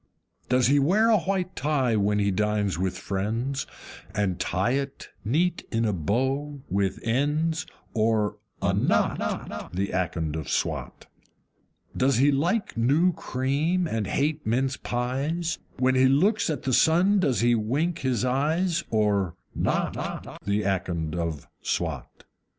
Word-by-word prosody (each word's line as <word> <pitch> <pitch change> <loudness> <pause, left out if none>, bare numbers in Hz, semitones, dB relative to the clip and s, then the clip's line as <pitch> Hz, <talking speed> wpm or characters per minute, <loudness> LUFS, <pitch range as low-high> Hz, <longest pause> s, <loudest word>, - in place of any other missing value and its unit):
Does 125 0 +3
he 145 +3 +4
wear 205 +11 +4
a 215 - +5
white 185 0 -2
tie 135 -5 +1
when 105 0 +2
he 100 -1 +2
dines 105 0 0
with 95 0 -1
friends, 110 +8 -2 0.5
And 95 -4 0
tie 95 +6 0
it 135 +1 -3
neat 165 - +1
in 115 0 +1
a 105 - +1
bow 130 - -1
with 95 0 0
ends, 150 +7 0 0.3
or 110 -2 +1 0.2
a - - +2
KNOT, - - -1
The 95 +2 -1
Akond 85 -4 -1
of 80 -3 -5
Swat? - - -2 0.9
Does 130 -1 +2
he 140 +3 +5
like 175 +11 0
new 145 +10 +3
cream, 150 +8 0
and 115 - -2
hate 150 +2 0
mince 130 +4 0
pies? 140 +9 -2 0.2
When 130 +1 +3
he 130 0 +5
looks 195 +11 +3
at 150 -5 -2
the 130 - 0
sun 180 - +4
does 135 -11 +1
he 120 0 +4
wink 140 +10 0
his 130 -2 0
eyes, 160 +7 +1
or 100 -5 +1 0.2
NOT, - - -2 0.2
The 105 +1 0
Akond 85 -5 -1
of 85 -4 -3
Swat? - - -3
130 Hz, 140 wpm, -26 LUFS, 105-155 Hz, 0.9 s, a